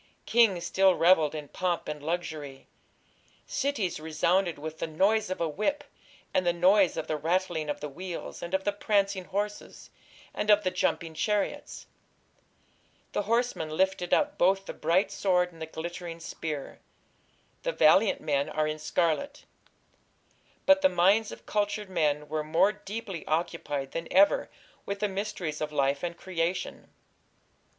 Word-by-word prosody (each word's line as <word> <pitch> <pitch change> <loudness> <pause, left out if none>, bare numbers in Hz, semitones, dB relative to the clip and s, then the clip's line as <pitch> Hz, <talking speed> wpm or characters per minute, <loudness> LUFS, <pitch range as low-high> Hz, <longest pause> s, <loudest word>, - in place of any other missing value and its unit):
Kings 220 -7 +3
still 190 -1 +4
revelled 165 -3 +4
in 150 -1 -6
pomp 180 -2 -2
and 150 -1 -5
luxury. 155 -4 -4 0.8
Cities 270 - -1
resounded 170 +3 +1
with 155 +2 -7
"the - - -2
noise 200 +7 +2
of 185 - -3
a 170 - +1
whip, 215 - -1 0.5
and 185 - +2
the 175 - +3
noise 185 +2 +4
of - - -2
the 155 - -2
rattling 165 0 -1
of 145 - -3
the 150 - -3
wheels, 175 +5 -7
and 170 +2 -2
of 190 - -1
the 205 - +1
prancing 200 -2 0
horses, 205 +2 -5 0.4
and 210 - -3
of 210 0 +6
the 185 - 0
jumping 170 -2 -1
chariots. 210 +5 -2 1.3
The - - 0
horseman 230 -6 0
lifteth 180 +2 0
up 295 0 +2
both 195 +2 +3
the - - -6
bright 180 +4 +1
sword 180 -2 +1
and 165 - -15
the 160 - -4
glittering 170 +1 -6
spear.... 155 -3 -6 0.8
The - - -1
valiant 195 - +4
men 140 0 0
are 155 0 0
in 155 0 -3
scarlet." 175 - -1 1.2
But 285 0 +6
the 285 - +5
minds 205 +4 +3
of - - -11
cultured 205 -1 -1
men 150 -4 0
were 155 0 -2
more 165 +6 +3
deeply 205 -4 -7
occupied 155 -4 -2
than 165 0 -4
ever 195 +2 +4 0.3
with 200 0 -4
the 210 - +1
mysteries 190 -6 -4
of 155 0 -2
life 140 -1 +1
and 170 -1 -4
creation. 175 0 -3
180 Hz, 155 wpm, -28 LUFS, 155-200 Hz, 1.3 s, of